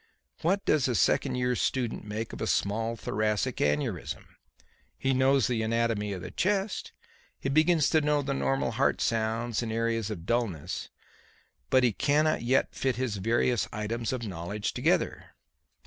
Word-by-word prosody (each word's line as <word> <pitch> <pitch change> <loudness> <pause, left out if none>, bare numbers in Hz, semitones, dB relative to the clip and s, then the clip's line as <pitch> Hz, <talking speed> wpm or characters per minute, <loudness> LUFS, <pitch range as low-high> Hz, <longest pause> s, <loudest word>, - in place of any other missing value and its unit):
What 195 +5 +1
does 145 -4 +3
a 125 - 0
second 90 - +2
year's 125 -1 0
student 125 -4 -1
make 110 +2 -5
of - - -7
a - - -1
small 110 +3 0
thoracic 110 +3 -1
aneurysm? 75 0 -1 0.7
He 135 0 +1
knows 130 -1 +4
the 120 -1 0
anatomy 110 -2 0
of 95 -3 -5
the - - -7
chest; 195 +1 -1 0.5
he 135 - -2
begins 155 +1 +4
to 155 - +4
know 150 -1 +1
the 140 0 -1
normal 135 0 0
heart 130 +5 +1
sounds 115 +1 0
and 115 -2 -3
areas 115 -1 0
of 90 -6 -6
dullness; 95 -8 -2 0.8
but 130 -1 +4
he 120 -3 +3
cannot 155 +7 +2
yet 125 +3 +1
fit 130 -2 0
his 125 -5 -2
various 115 +4 +1
items 110 +2 -2
of 125 -3 -3
knowledge 95 +2 -4
together. - - 0
115 Hz, 160 wpm, -28 LUFS, 110-135 Hz, 0.8 s, knows